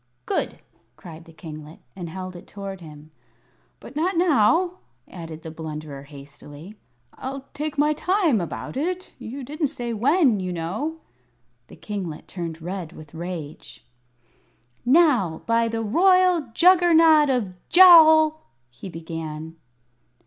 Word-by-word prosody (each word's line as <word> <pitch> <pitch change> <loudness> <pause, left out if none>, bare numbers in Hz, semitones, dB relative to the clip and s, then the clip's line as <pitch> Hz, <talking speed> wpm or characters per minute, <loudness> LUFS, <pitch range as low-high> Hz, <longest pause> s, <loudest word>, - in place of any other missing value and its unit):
"Good," - - -2 0.4
cried 165 -1 -12
the 165 - -15
kinglet, 155 -1 -10 0.2
and 175 -3 -7
held 185 +1 -7
it 175 - -12
toward 195 -2 -8
him. 155 -1 -13 0.7
"But - - -13
not 335 +4 0
now," 345 - +2 0.3
added 165 -2 -9
the 160 - -7
Blunderer, 155 -3 -8
hastily; 145 +4 -12 0.4
"I'll 270 +1 -7
take 305 +1 -5
my 300 +1 +3
time 335 - +1
about 170 - -6
it. 360 +6 -3
You 265 +5 -7
didn't 300 +4 -2
say 240 -4 -5
when, 260 - +2
you 185 -1 -4
know." 270 - -4 0.7
The - - -14
kinglet 190 -7 -6
turned 165 -3 -7
red 180 -2 -6
with 155 -3 -13
rage. 165 -3 -8 1.0
"Now, 245 - +3
by 230 0 +2
the 225 0 -3
royal 360 - +3
Juggernaut 330 -1 +5
of 235 -8 -1 0.2
Jowl 315 -3 +7 0.2
" 120 +1 -46
he 125 +10 -10
began. 160 -1 -7
210 Hz, 130 wpm, -23 LUFS, -, 1.0 s, Jowl